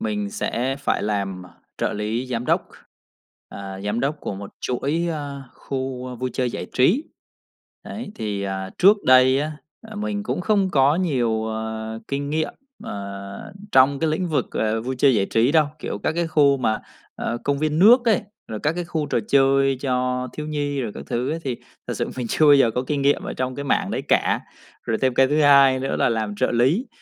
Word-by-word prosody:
mình 210 -2 -2
sẽ 135 - -2
phải - - 0
làm, 100 -3 -2
ờ, 90 - -14 0.3
trợ - - 0
lý 110 +4 -2
giám 120 -1 -3
đốc, - - +1 0.8
ờ, 95 -1 -8
giám 105 +3 -1
đốc 145 +2 -1
của - - -4
một 100 +1 -8
chuỗi, 145 +7 -1
ơ, 145 -3 -5
khu, 130 -1 -5
ơ, 125 - -6
vui 125 +1 -3
chơi 125 -1 -1
giải - - -5
trí. 195 - +3 0.8
Đấy, 215 -1 -7
thì, 105 -2 -3
ờ, 95 -1 -4
trước 200 +4 +7
đây 130 +1 +6
á, 155 +1 -2 0.4
ờ, 215 - -9
mình 210 0 -2
cũng 215 - -2
không 195 0 +1
có 140 -1 +4
nhiều, 120 -10 0
à, 110 0 -5
kinh 140 +1 -3
nghiệm, 155 +1 -1 0.3
ờ, 100 - -7 0.2
trong 135 +1 +5
cái 160 0 +1
lĩnh 175 +3 -1
vực, 155 - 0
ờ, 110 +1 0
vui 130 +2 -3
chơi 135 -1 +5
giải 100 -3 +1
trí 115 +5 +2
đâu, 155 -2 +4
kiểu, 105 - -4
các - - +1
cái 170 +1 -1
khu 145 -3 +4
mà, 110 -4 0 0.4
à, 120 - -2
công 140 0 0
viên 155 +1 0
nước 235 +7 +7
ấy, 225 -5 +3 0.3
rồi 110 -1 -5
các 150 - +2
cái 175 +1 -4
khu 160 -3 -2
trò - - 0
chơi 135 0 +4
cho 125 -1 -1
thiếu 150 - -6
nhi 145 -2 -2
rồi 115 -5 -3
các - - -7
thứ 125 +2 -1
ấy 165 - -3
thì 130 -3 -2 0.3
thật - - -3
sự - - -3
mình 125 -2 -3
chưa 155 - +3
bao 145 - +8
giờ 135 -5 +5
có 125 +3 -2
kinh 145 0 -1
nghiệm 140 +1 +2
ở - - -4
trong 130 0 -2
cái 140 - -5
mảng 140 - 0
đấy - - -2
cả. - - +3 0.4
Rồi 110 - -1
thêm 130 -2 +1
cái 135 +1 +5
thứ 150 +2 +2
hai 140 -2 +6
nữa 135 - -2
là - - +2
làm 110 -3 -2
trợ 130 - +1
lý, 135 - +2
135 Hz, 215 wpm, -22 LUFS, 115-155 Hz, 0.8 s, bao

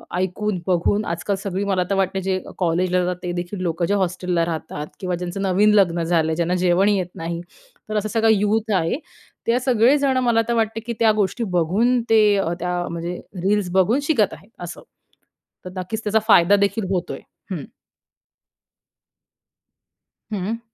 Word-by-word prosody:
ऐकून, 185 +2 -1
बघून 185 +4 +2
आजकाल 180 +4 -2
सगळी 195 0 -3
मला 190 -2 +1
तर 195 - +1
वाटते, 190 0 0
जे 190 0 -1 0.2
कॉलेजला 180 +1 +1
जातात 180 0 -2
ते 175 - -2
देखील 175 +2 -4
लोकं, 170 -1 -1
जे 200 - 0
हॉस्टेलला 180 -3 0
राहतात 155 -2 -5
किंवा 180 -2 -2
ज्यांचं 180 +2 -5
नवीन 200 +2 +3
लग्न 175 -4 +3
झालंय, 160 -1 +1
ज्यांना 175 +2 0
जेवण 185 +3 +3
येत 190 -4 +1
नाही, 170 +1 -4 0.5
तर 215 - -1
असा 215 +1 -1
सगळा 225 +1 +2
यूथ 215 +2 +1
आहे; 165 +3 +1 0.5
ते 240 +2 +3
सगळे 255 +2 +4
जण 270 -2 +1
मला 225 -1 +4
तर 235 - +1
वाटते 225 0 0
की, 235 +1 -5
त्या 225 -1 +5
गोष्टी 200 +5 -1
बघून 225 +10 +2
ते 225 -1 +6 0.4
त्या 180 +1 -2
म्हणजे 170 +1 -4 0.3
रील्स 200 -2 +1
बघून 190 +8 +3
शिकत 275 - +2
आहेत 195 +7 -13
असं. 175 -1 -7 0.8
तर 180 - -5
नक्कीच 210 +5 -4
त्याचा 215 +1 +2
फायदा 200 -2 +6
देखील 200 +1 0
होतोय. 180 -2 -2 0.3
हम्म. - - -3 2.7
हं. 210 +4 -3
190 Hz, 160 wpm, -22 LUFS, 175-215 Hz, 2.7 s, ते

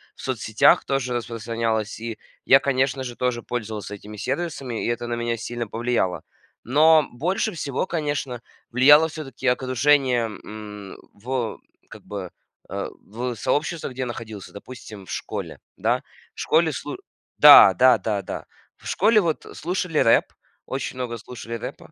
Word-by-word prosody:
в - - -13
соцсетях 110 -4 +3
тоже 135 -2 -1
распространялась. 115 -2 -2
И 115 0 -5 0.3
я, 135 - +7
конечно 135 -1 0
же, 120 -2 -6
тоже 125 -2 -1
пользовался 110 -4 -5
этими 105 +1 -11
сервисами, 135 - -3
и - - -1
это 120 0 -2
на 120 - -3
меня 120 0 -2
сильно 120 +1 -5
повлияло. 115 -6 -1 0.4
Но 155 +4 +5
больше 180 - -1
всего, 145 -6 -2
конечно, 145 -7 -3 0.3
влияло 145 +6 +7
всё-таки 155 -4 -8
окружение, 130 0 +3
м, 105 -2 -9 0.2
в 120 +1 -3 0.3
как - - -12
бы, 100 -3 -6 0.4
э, - - -4
в 120 +4 -5
сообществах, 150 +5 -1
где 130 - -5
я - - 0
находился, 110 -4 -8
допустим, 105 -2 -11
в - - -10
школе, - - -5 0.2
да. - - +1 0.3
В - - -14
школе - - +3
слу - - -5 0.4
Да, 95 - +10
да-да-да, 110 -4 +2 0.3
в - - -12
школе 215 +2 +4
вот 165 -4 -2
слушали 175 -1 -2
рэп, 115 - +5 0.4
очень 135 0 -4
много 120 -2 -4
слушали 115 +1 -9
рэпа 115 - -8
120 Hz, 145 wpm, -23 LUFS, 110-135 Hz, 0.4 s, Да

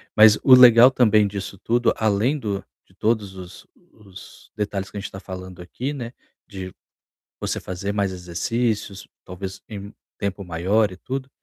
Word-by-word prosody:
Mas 110 0 +7
o 130 - +7
legal 125 0 +9
também 110 -5 +4
disso 100 -1 -6
tudo, 120 +5 +1
além 110 +7 +1
do 100 -6 -4 0.2
de 95 - -27
todos 105 -1 -1
os 90 -1 -11 0.3
os 100 -3 -15
detalhes 100 -2 -3
que 105 - -8
a - - -2
gente 100 - -7
tá 95 - -8
falando 95 -2 -9
aqui, 125 - -5
né, 120 -4 -6 0.3
de 95 -3 -8 0.7
você - - -2
fazer 95 +2 -5
mais 100 -2 -1
exercícios, 100 +3 -3 0.2
talvez, 95 +1 -8
em 100 -1 -8 0.2
tempo 100 0 -3
maior 95 +5 +1
e 90 - -10
tudo, 130 +4 -5
100 Hz, 165 wpm, -22 LUFS, 95-115 Hz, 0.7 s, legal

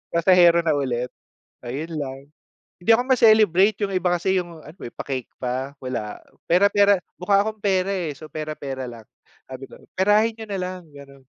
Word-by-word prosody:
Pasahero 170 -1 +5
na 160 - +1
ulit, 125 -2 -2 0.5
ayun 145 +7 -5
lang. 135 -2 -5 0.6
Hindi 225 +5 +5
ako 245 - 0
ma-celebrate, 215 -4 +4
yung 195 - -4
iba 185 -1 0
kasi 190 +2 0
yung 170 -3 -10
ano 155 +6 -14
eh, - - -10
pa-cake 130 -4 -5
pa. 130 +3 -4
Wala, 120 -5 -4 0.3
pera-pera 200 +2 +4 0.2
mukha 200 +2 +3
akong 215 -1 -5
pera 195 -1 +1
eh. 165 -7 -3
So, 155 -2 -13
pera-pera 140 -4 -5
lang 115 -2 -11 0.5
sabi 130 +1 -8
ko - - -16 0.2
perahin 210 +4 +4
niyo 220 - -7
na 200 -2 -4
lang 180 -2 -6
gano'n. 140 -1 -14
170 Hz, 170 wpm, -22 LUFS, 135-195 Hz, 0.6 s, Pasahero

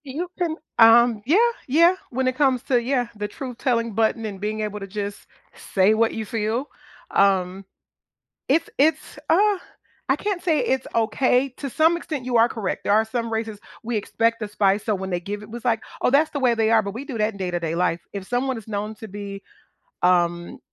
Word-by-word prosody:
You 310 +7 -4
can, 340 -3 -1 0.2
um 230 -1 +6
Yeah, 315 +9 +4 0.3
yeah, 335 +7 +5
when 260 +1 -1
it 255 - 0
comes 265 -3 +2
to 245 -3 +2
yeah, 245 0 0
the 210 0 -3
truth-telling 235 -1 -2
button 225 +1 +1
and 200 -3 -6
being 215 +1 -2
able 210 -1 -3
to 195 - -7
just 205 +1 -6 0.5
say 195 +2 +5
what 225 +1 +2
you 220 - -4
feel, 225 +4 -2 0.5
um, 190 -1 +2 0.8
it's 305 +5 +2
it's, 305 +1 +1
uh 400 +4 +4 0.5
I - - +3
can't 400 -4 -3
say 320 -4 +2
it's 260 0 0
okay. 250 +3 +2
To 275 - -5
some 320 +6 +3
extent, 300 -6 -5
you 250 -1 0
are 230 +1 +5
correct, 210 -6 -4
there - - +2
are 215 +1 +4
some 230 0 -3
races 220 -1 -3 0.3
we 235 0 -2
expect 230 +2 0
the 215 - -3
spice, 205 -1 +1
so 215 - +1
when 190 0 -5
they 175 -1 -1
give 205 +3 -6
it, 210 - -11
it's 235 -1 -7
like, 230 -3 +1 0.2
"Oh, - - +3
that's 295 +4 +3
the 285 - -4
way 250 -3 +3
they 225 -1 +1
are," 225 -1 +5
but 200 -1 -5
we 250 +5 -6
do 265 -6 -6
that 215 +1 +1
in - - -11
day-to-day 175 -3 -2
life, 175 -1 0
if 195 -2 -6
someone 250 +2 -1
is 220 - -12
known 210 +1 -3
to 220 - -9
be, 200 0 -7 0.6
um, 175 -1 +1
225 Hz, 210 wpm, -23 LUFS, 205-260 Hz, 0.8 s, um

